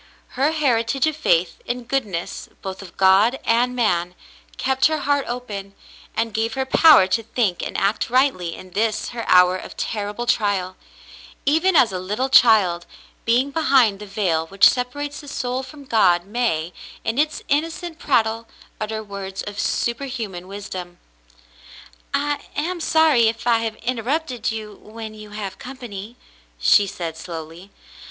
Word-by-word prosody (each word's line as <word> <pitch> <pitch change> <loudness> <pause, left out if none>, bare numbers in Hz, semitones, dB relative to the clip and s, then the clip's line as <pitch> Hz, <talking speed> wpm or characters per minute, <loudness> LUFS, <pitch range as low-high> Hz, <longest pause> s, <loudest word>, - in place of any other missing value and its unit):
Her 275 +3 +1
heritage 265 -4 +1
of 310 -1 0
faith 175 - +1
in 245 0 -4
goodness 220 -9 -3
— - - -37
both 190 0 -6
of 195 - -13
God 195 +6 +5
and 245 +2 +2
man 180 -7 0 0.2
— - - -26
kept 265 0 +2
her 315 0 -1
heart 285 0 +1
open, 205 -5 -6 0.4
and 225 -1 0
gave 225 +1 -1
her 265 0 -1
power 295 - +7
to 190 +5 0
think 220 -5 -1
and - - -4
act 200 +2 0
rightly 245 -10 +1
in 185 - -12
this 215 +2 -1
her 235 -1 -5
hour 180 0 +6
of 185 - -8
terrible 210 +2 -3
trial; 200 -5 0 0.7
even 325 +6 +3
as 255 -8 +5
a 185 - -3
little 210 +9 -2
child, 205 -9 +5 0.4
being 250 +5 +2
behind 265 -9 +3
the 210 - -9
veil 180 -6 0
which 195 +3 +6
separates 285 +4 -2
the 290 - -12
soul 255 -1 -2
from 280 +2 -12
God, 180 -8 +3
may, 195 -7 -1 0.3
in 225 +4 -1
its 305 +1 0
innocent 325 +3 -2
prattle, 230 -5 +1 0.3
utter 220 0 -3
words 195 -2 -6
of 205 0 -7
superhuman 235 -8 -2
wisdom. 185 -3 -7 1.1
"I 290 +1 0 0.2
am 345 +4 -2
sorry 315 -8 +4
if 225 +1 -2
I 235 -2 +4
have 225 -1 -3
interrupted 250 +2 -2
you 215 -1 -6
when 220 0 -9
you 215 -1 -11
have 205 -2 -6
company," 235 -4 -8 0.4
she 200 - +5
said 165 -3 -5
slowly. 165 +2 -8
225 Hz, 155 wpm, -22 LUFS, 195-260 Hz, 1.1 s, power